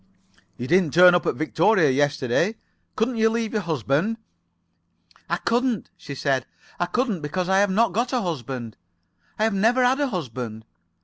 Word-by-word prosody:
"You 120 - -5
didn't 170 0 +2
turn 180 0 +8
up 175 - +1
at - - 0
Victoria 160 +1 +2
yesterday. 145 - +1 0.4
Couldn't 230 +2 -1
you 220 0 +3
leave 225 -1 -2
your 215 - 0
husband?" 160 - -1 1.1
"I - - 0
couldn't," 240 -2 -1
she 140 - -9
said. 135 -2 -1 0.3
"I 175 - 0
couldn't, 220 - -1
because 150 +5 -3
I've 195 +2 +3
not 205 +1 +2
got 235 +4 -1
a 250 -2 0
husband. 130 - -5 0.6
And 215 - 0
have 220 -1 +2
never 235 +6 +3
had 260 +3 +2
a 285 - +1
husband. 125 - -5
180 Hz, 165 wpm, -23 LUFS, 145-225 Hz, 1.1 s, turn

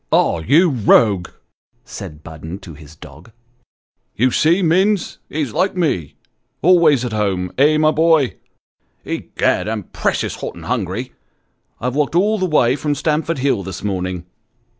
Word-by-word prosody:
" - - -49
Ah, 85 - +2
you 145 - +4
rogue! 105 -6 +3 0.3
" - - -68
said 75 0 -9
Budden 80 +2 -8
to 90 -4 -10
his 75 0 -14
dog; 115 - -14 0.4
" - - -54
you 130 +3 +2
see, 170 +8 +2
Minns, 185 +3 +1
he's 145 -7 -3
like 190 0 0
me, 90 - -1 0.5
always 160 -7 +4
at 120 - -4
home, 95 -4 -1
eh, 150 +2 +5
my 155 0 +3
boy? 160 -4 +3 0.7
Egad, - - -1
I'm 110 -2 -3
precious - - -2
hot - - -6
and - - -11
hungry! - - -3 0.7
I've 125 +1 -2
walked 150 +2 0
all 210 +4 +2
the 185 - 0
way 130 -6 +3
from 145 0 -2
Stamford 155 +2 -1
Hill 135 -6 0
this 95 -1 -7
morning." 90 -3 -3
130 Hz, 160 wpm, -18 LUFS, -, 0.7 s, eh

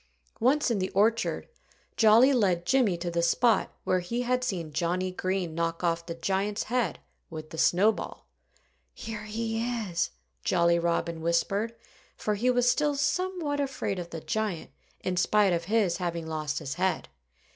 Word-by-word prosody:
Once 265 +3 +3
in 220 - +1
the 185 0 -1
orchard, 220 +3 +1 0.5
Jolly 230 +5 +6
led 185 -8 +2
Jimmy 240 -8 +3
to 170 0 -3
the 170 0 0
spot 215 +6 +2
where 185 - +2
he 235 +8 -2
had 250 +1 0
seen 175 -10 -3
Johnnie 180 +3 0
Green 185 -2 -2
knock 165 +1 -2
off 170 0 0
the 170 - -4
giant's 195 +4 -1
head 235 - -1 0.3
with 155 -1 -8
the 160 - -6
snowball. 205 +5 +2 0.7
"Here 215 -1 -6
he 225 +1 -2
is!" 225 -8 -1 0.3
Jolly 170 0 +3
Robin 170 -1 -1
whispered 195 +7 0 0.4
for 210 - -1
he 230 +5 +1
was 245 -1 +3
still 290 +4 +2
somewhat 320 0 -1
afraid 265 -8 -2
of 170 -1 -6
the 165 -1 -6
giant, 215 -5 -3 0.3
in 180 -1 -2
spite 200 +1 +3
of 170 0 -1
his 200 -4 +1
having 170 -2 -3
lost 155 -1 -3
his 140 -4 -4
head. 190 0 0
190 Hz, 160 wpm, -28 LUFS, 170-230 Hz, 0.7 s, Jolly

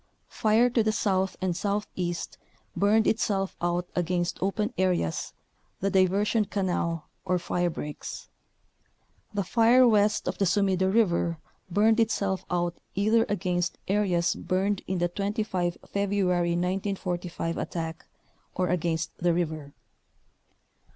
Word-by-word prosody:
Fire 220 +3 +3
to 235 - +3
the 215 0 +2
south 190 -3 0
and 185 -2 0
southeast 190 -3 -3 0.4
burned 210 +2 +3
itself 205 -4 0
out 175 +1 0
against 175 0 -1
open 210 +4 -1
areas, 180 - 0 0.5
the 195 +1 0
Diver 190 +2 +3
sion 215 0 +1
Canal 180 -5 -2 0.2
or 185 -1 +1
firebreaks. 175 -4 -3 1.0
The 205 -1 -1
fire 235 +6 +5
west 210 -2 +3
of - - -3
the 200 - +3
Sumida 190 0 +2
River 175 -6 +2 0.3
burned 215 +5 +3
itself 200 -4 +1
out 175 -1 0 0.2
either 215 +3 +3
against 180 -3 -1
areas 185 -4 +2
burned 195 +2 -1
in 190 - -1
the 175 0 +1
25 195 -2 -2
February 190 -4 +1
1945 180 -2 -2
attack, 165 -1 -5 0.5
or 180 -1 0
against 170 -2 -1
the 175 -1 +2
river. 155 -4 -2
190 Hz, 120 wpm, -27 LUFS, 175-205 Hz, 1.0 s, fire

